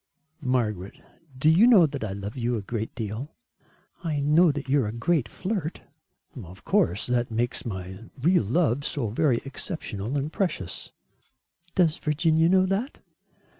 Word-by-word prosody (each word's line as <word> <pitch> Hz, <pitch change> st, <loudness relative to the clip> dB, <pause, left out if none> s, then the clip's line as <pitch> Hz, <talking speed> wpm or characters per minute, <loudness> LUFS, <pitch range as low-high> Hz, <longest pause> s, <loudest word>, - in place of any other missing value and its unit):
"Margaret, 105 Hz, -7 st, -1 dB, 0.4 s
do 135 Hz, -, +1 dB
you 175 Hz, +9 st, +6 dB
know 210 Hz, -9 st, +7 dB
that 140 Hz, -5 st, -4 dB
I 100 Hz, -3 st, -3 dB
love 100 Hz, +2 st, -6 dB
you 120 Hz, -1 st, -1 dB
a 105 Hz, -, -3 dB
great 110 Hz, +1 st, -4 dB
deal?" 110 Hz, +6 st, -5 dB, 0.7 s
"I 155 Hz, -4 st, -1 dB
know 155 Hz, +4 st, +5 dB
that 140 Hz, -2 st, -5 dB
you 140 Hz, +1 st, +3 dB
are 110 Hz, -, -1 dB
a -, -, -3 dB
great 120 Hz, +2 st, 0 dB
flirt." 185 Hz, -5 st, -4 dB, 0.6 s
"Of 90 Hz, +1 st, -13 dB
course. 90 Hz, +5 st, +2 dB
That 125 Hz, -1 st, 0 dB
makes 120 Hz, +2 st, -1 dB
my 95 Hz, +1 st, -6 dB
real 175 Hz, +7 st, +4 dB
love 140 Hz, -, +1 dB
so 130 Hz, -6 st, -2 dB
very 120 Hz, +2 st, +1 dB
exceptional 135 Hz, -, -4 dB
and 145 Hz, +3 st, -3 dB
precious." 155 Hz, -, -3 dB, 0.8 s
"Does 165 Hz, -4 st, +3 dB
Virginia 160 Hz, +2 st, +2 dB
know 185 Hz, 0 st, +4 dB
that?" 195 Hz, +8 st, -2 dB
135 Hz, 155 wpm, -26 LUFS, 110-160 Hz, 0.8 s, know